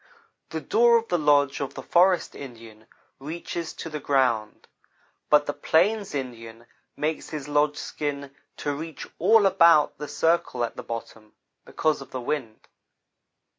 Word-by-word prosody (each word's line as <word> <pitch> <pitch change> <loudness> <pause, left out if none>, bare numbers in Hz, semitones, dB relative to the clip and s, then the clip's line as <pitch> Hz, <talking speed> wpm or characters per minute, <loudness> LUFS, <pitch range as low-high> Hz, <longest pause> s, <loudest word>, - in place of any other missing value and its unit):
The 160 - -4
door 235 +5 +4
of 230 0 -4
the 175 - +1
lodge 145 -2 +3
of 140 - -4
the - - -7
forest 180 +1 +3
Indian 115 -5 -11 0.3
reaches 160 +3 -5
to - - -7
the 155 -1 -5
ground, 125 -7 0 0.6
but 150 -1 +5
the 145 - -2
plains 195 +4 +1
Indian 115 -3 -7 0.3
makes 150 +2 -3
his 150 -3 -6
lodge 145 0 +1
skin 140 -2 -5 0.2
to 145 - -2
reach 160 +2 -7
all 210 +4 +5
about 170 -5 +5
the 150 - -5
circle 150 -4 0
at 115 - -3
the - - -6
bottom, 110 -2 -8 0.3
because 155 -2 0
of 135 - -10
the 130 - -5
wind. 120 -3 -4
145 Hz, 150 wpm, -25 LUFS, 130-165 Hz, 0.6 s, but